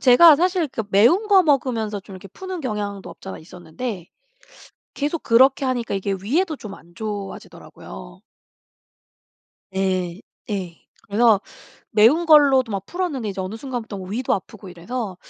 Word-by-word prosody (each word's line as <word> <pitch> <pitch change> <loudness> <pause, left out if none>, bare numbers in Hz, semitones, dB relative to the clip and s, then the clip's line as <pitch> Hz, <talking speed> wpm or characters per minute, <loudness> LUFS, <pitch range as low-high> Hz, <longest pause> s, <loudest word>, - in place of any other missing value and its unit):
제가 280 +6 +8
사실 355 +2 +1
그 225 - -4
매운 320 - +4
거 390 -2 +6
먹으면서 235 -8 0
좀 195 0 -13
이렇게 185 - -12
푸는 375 - -7
경향도 205 -5 -4
없지 190 - -11
않아 - - -6
있었는데 180 +4 -7 0.9
계속 295 +3 -2
그렇게 265 +4 +4
하니까 245 -4 -2
이게 195 0 -1
위에도 310 - 0
좀 210 -6 -9
안 170 +1 -18
좋아지더라고요. 195 - -8 1.5
네 185 -1 -1 0.3
예. 185 -5 -4 0.3
그래서 220 0 +3 0.5
매운 240 +11 +4
걸로도 280 -6 +5
막 195 -1 -3
풀었는데 330 - -3
이제 195 -1 -4
어느 190 +3 -5
순간부터 235 -4 -6
위도 205 +7 -2
아프고 195 +1 -8
이래서 185 +3 -5
220 Hz, 320 characters per minute, -22 LUFS, 195-275 Hz, 1.5 s, 제가